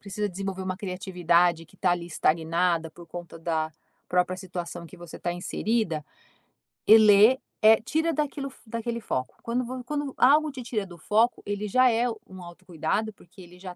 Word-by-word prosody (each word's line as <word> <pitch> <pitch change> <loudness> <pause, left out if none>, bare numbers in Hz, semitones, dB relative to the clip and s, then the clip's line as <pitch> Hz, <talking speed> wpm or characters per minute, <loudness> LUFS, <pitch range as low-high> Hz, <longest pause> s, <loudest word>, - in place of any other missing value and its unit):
precisa 205 +1 -3
desenvolver 190 0 -5
uma 185 0 -3
criatividade 180 -4 +1
que - - -22
tá 185 - +1
ali 175 -1 -3
estagnada 165 0 +1
por 175 +1 -14
conta 175 0 -9
da 160 -1 -1 0.4
própria 180 +1 +1
situação 175 -2 -6
que - - -14
você 175 -2 -10
está 175 - -3
inserida, 175 -2 -1 0.8
e 220 - +10
lê, 215 +4 +6 0.2
eh, 220 +1 +7
tira 320 +7 0
daquilo 280 -2 -3 0.2
daquele 235 +1 -4
foco, 130 -11 -3
quando 240 +2 -1
vo 255 +1 -6
quando 290 +1 -3
algo 300 +4 +5
te 265 -2 -8
tira 220 -4 -2
do 175 -2 -12
foco, 220 +7 +1
ele 205 +1 -3
já 255 +5 +4
é 235 +2 +1 0.2
um 185 -1 -11
autocuidado 175 +4 -3
porque 185 0 -17
ele 180 0 -14
já 185 -1 -8
190 Hz, 175 wpm, -26 LUFS, 175-230 Hz, 0.8 s, e